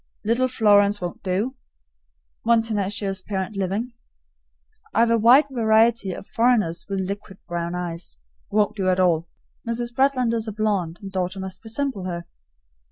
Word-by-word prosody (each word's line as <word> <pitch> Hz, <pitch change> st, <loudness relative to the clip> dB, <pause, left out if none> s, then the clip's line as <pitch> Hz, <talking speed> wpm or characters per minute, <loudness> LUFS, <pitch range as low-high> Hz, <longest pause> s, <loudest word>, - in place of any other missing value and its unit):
Little 235 Hz, +4 st, +2 dB
Florence 205 Hz, -4 st, +4 dB
won't 175 Hz, -1 st, -5 dB
do 205 Hz, +8 st, -1 dB, 0.8 s
one 230 Hz, 0 st, +3 dB
tenacious 200 Hz, -3 st, -1 dB
parent 195 Hz, +1 st, -4 dB
living. 200 Hz, +6 st, -2 dB, 1.0 s
I've 230 Hz, +1 st, +4 dB
a 230 Hz, -, +4 dB
wide 245 Hz, +7 st, +7 dB
variety 225 Hz, -3 st, +3 dB
of 180 Hz, -, -7 dB
foreigners 225 Hz, -9 st, +1 dB
with 195 Hz, -1 st, -1 dB
liquid 200 Hz, -1 st, -6 dB
brown 170 Hz, 0 st, -3 dB
eyes 170 Hz, -, -4 dB, 0.3 s
won't 210 Hz, 0 st, +1 dB
do 195 Hz, -3 st, -1 dB
at 185 Hz, 0 st, +2 dB
all. 170 Hz, -2 st, +2 dB, 0.4 s
Mrs. 240 Hz, +1 st, -2 dB
Bretland 260 Hz, -2 st, +2 dB
is 225 Hz, -1 st, -1 dB
a -, -, -2 dB
blonde, 200 Hz, -6 st, -1 dB
and 195 Hz, -, -7 dB
daughter 185 Hz, 0 st, -2 dB
must 190 Hz, 0 st, -6 dB
resemble 225 Hz, -3 st, -3 dB
her. 170 Hz, -2 st, -4 dB
205 Hz, 150 wpm, -23 LUFS, 185-230 Hz, 1.0 s, wide